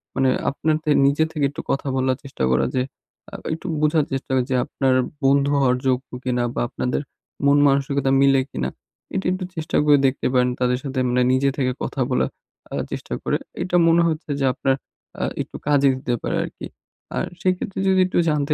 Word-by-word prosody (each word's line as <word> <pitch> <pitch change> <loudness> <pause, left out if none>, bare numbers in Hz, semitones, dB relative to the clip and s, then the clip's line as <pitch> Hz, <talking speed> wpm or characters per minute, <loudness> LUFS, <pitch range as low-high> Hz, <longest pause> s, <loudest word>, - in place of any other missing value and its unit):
মানে 135 -1 +3 0.2
আপনার 155 +2 0
থে 150 - +1
নিজে 145 +3 +3
থেকে 150 -3 0
একটু 145 - -6
কথা 135 +1 -1
বলার 130 0 +1
চেষ্টা 135 - -5
করা 65 - +3
যে 130 - +2
একটু 130 +1 -11
আ - - -5 0.2
একটু 165 - -6
বোঝার 150 -1 +2
চেষ্টা 135 0 -3 0.2
যে 130 - +1
আপনার 135 -1 +1 0.3
বন্ধু 140 +1 +4
হওয়ার 125 -2 +3
যোগ্য 130 +1 0
কিনা? 125 -1 0
বা - - 0
আপনাদের 125 +2 -2 0.4
মন 140 +1 +5
মানসিকতা 140 0 +1
মিলে 135 -1 +5
কিনা? 65 0 -2 0.4
এটা 195 - -2
একটু 185 0 -2
চেষ্টা 160 -1 -2
করে 145 -1 +6
দেখতে 130 - -1
পারেন। 125 0 +3
তাদের 125 0 +2
সাথে 135 -2 -3
মানে 125 +1 +2
নিজে 135 +1 +3
থেকে 130 -2 +1
কথা 135 - -3
বলার 125 - +1 0.4
আ - - -3 0.2
চেষ্টা - - -5
করে। - - +1 0.3
এটা 180 -1 -2
মনে 165 +1 +5
হচ্ছে 155 0 -4
যে 135 - +1
আপনার 135 -1 +1 0.5
আ - - +1 0.2
একটু - - -8
কাজে 140 -1 +4
দিতে 130 -1 -3
পারে - - -1
আরকি। - - -7 0.5
আর - - 0 0.2
সেক্ষেত্রে 185 +1 -1
যদি 190 0 +4
একটু - - -2
জানতে 150 0 +1
140 Hz, 195 wpm, -22 LUFS, 130-150 Hz, 0.5 s, করে